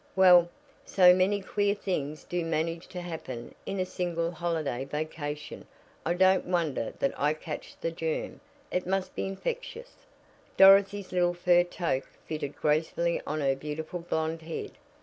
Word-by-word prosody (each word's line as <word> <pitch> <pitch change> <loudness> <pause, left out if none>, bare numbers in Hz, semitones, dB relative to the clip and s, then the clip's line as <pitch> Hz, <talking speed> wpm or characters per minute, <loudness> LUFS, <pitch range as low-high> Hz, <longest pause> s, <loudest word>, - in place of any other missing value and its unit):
"Well, 180 -2 +7 0.3
so 180 -2 +6
many 190 +3 +2
queer 205 +1 0
things 155 -7 -3
do 175 -1 -2
manage 165 +1 -2
to 180 - -7
happen 130 -9 -7
in 195 - -3
a 185 - +1
single 170 -2 -2
holiday 160 -6 -2
vacation 150 +1 -5 0.4
I 170 - +1
don't 185 +1 +4
wonder 165 -9 -1
that 140 - 0
I 150 +2 +2
catch 155 -1 -8
the 165 - -2
germ; 165 -1 -3 0.3
it 180 -1 -1
must 190 0 -1
be - - -3
infectious." 485 - -6 0.5
Dorothy's 195 0 +6
little 175 -1 +2
fur 175 0 +4
toque 170 -6 -2 0.2
fitted 150 -3 -4
gracefully 160 +3 0
on 155 +1 -2
her 135 -1 +2
beautiful 150 +5 -5
blonde 160 -1 -2
head. 160 0 -5
170 Hz, 150 wpm, -28 LUFS, 155-185 Hz, 0.5 s, Well